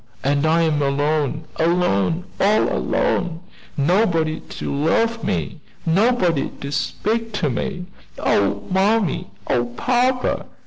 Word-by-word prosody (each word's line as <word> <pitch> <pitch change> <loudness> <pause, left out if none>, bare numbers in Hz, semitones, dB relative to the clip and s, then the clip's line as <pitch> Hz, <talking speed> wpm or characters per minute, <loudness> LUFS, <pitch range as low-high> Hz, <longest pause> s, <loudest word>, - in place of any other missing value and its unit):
and 140 +2 +2
I 165 +1 +3
am 155 -2 +1
alone! 145 +2 0
alone! 165 - +1 0.2
all 210 +2 +3
alone! 180 - 0 0.4
nobody 165 0 +2
to - - -6
love 225 +11 +1
me 80 -5 -2 0.2
nobody 180 - +2
to 140 - -5
speak 225 +8 -2
to 165 -9 0
me. 180 +8 -3 0.3
Oh, 100 0 +1
mammy! 195 - +1 0.2
Oh, 120 -1 +1
papa! 250 +1 +1
165 Hz, 115 wpm, -21 LUFS, 145-210 Hz, 0.4 s, I